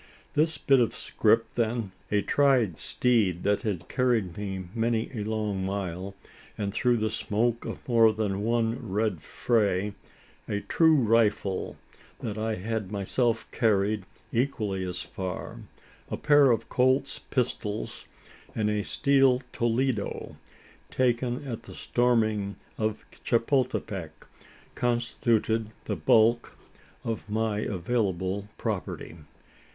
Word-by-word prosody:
This 155 0 +2
bit 135 -1 +4
of 120 - +1
scrip 115 +1 +1
then 115 -3 -1 0.2
a 105 -1 +2
tried 130 - +3
steed 110 -8 +1
that 100 0 +2
had 90 -6 -3
carried 115 -9 +1
me 95 -2 -4
many 115 0 0
a 110 -4 -3
long 105 -3 -2
mile, 95 0 -3 0.4
and 100 -1 -2
through 120 +1 +2
the 110 -1 0
smoke 115 +2 0
of - - -7
more 115 -3 +6
than 105 -2 -2
one 115 +1 +1
red 105 -5 0
fray 105 -4 0 0.5
a 105 0 -2
true 160 -1 +4
rifle, 110 -6 +1 0.4
that 105 - -4
I 110 0 -1
had 105 0 -3
myself 115 +3 0
carried 105 -3 +1 0.2
equally 110 -7 -1
as 90 -1 -4
far 95 -1 -6 0.5
a - - -3
pair 145 -2 +5
of 115 -2 +1
Colt's 130 +2 +2
pistols 115 -4 -3 0.5
and 105 -1 +1
a 105 -1 0
steel 135 -1 +3
"Toledo," 120 -2 -1 0.5
taken 125 +1 0
at 115 -4 -4
the - - -12
storming 110 -5 +1 0.2
of 110 -1 -2 0.2
Chapultepec 115 - 0 0.6
constituted 115 -2 0 0.2
the - - -1
bulk 115 +2 +3 0.5
of 110 -3 -4
my 110 -1 0
available 95 -1 -1
property. - - -4
110 Hz, 120 wpm, -27 LUFS, 100-120 Hz, 0.6 s, more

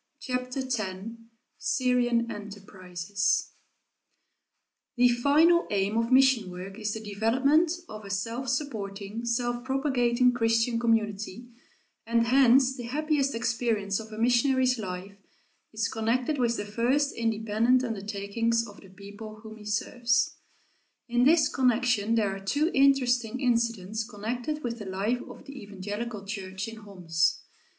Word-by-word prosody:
CHAPTER 250 +1 -3
X 255 -3 -1 0.8
SYRIAN 245 -2 +1
ENTERPRISES 200 -2 -3 1.5
The 245 0 +6
final 300 +8 +4
aim 200 +1 0
of 230 +2 0
mission 260 -6 +5
work 185 +3 -8
is 215 -1 -2
the - - -4
development 255 +10 +2
of 215 0 -9
a 200 - -9
self 230 +6 -3
supporting, 215 -5 -4
self 240 +1 -1
propagating 255 -2 +2
Christian 230 0 +1
community, 225 0 -1 0.6
and 230 0 +2
hence 260 +1 +5
the 245 -3 -7
happiest 290 0 0
experience 230 -4 0
of 220 0 -9
a 215 - -8
missionary's 250 +2 +3
life 190 0 -6 0.5
is 220 0 -1
connected 245 +6 -1
with 235 -1 +1
the 205 - -3
first 245 +7 +1
independent 225 +2 +1
undertakings 225 +1 -1
of 205 - -13
the 195 - -15
people 205 +3 -11
whom 220 0 -10
he 210 - -13
serves. 235 +5 0 0.8
In 245 +1 +3
this 305 0 +5
connection 245 -5 +1
there 205 -4 +1
are - - -7
two 295 - +1
interesting 255 -3 +3
incidents 230 -4 0
connected 240 +8 -4
with 235 -1 -3
the 210 - -7
life 205 +6 -1
of - - -12
the 275 -1 -9
evangelical 205 +2 -6
church 195 0 -5
in 225 0 -8
Homs. 170 -6 -1
230 Hz, 130 wpm, -27 LUFS, 205-250 Hz, 1.5 s, The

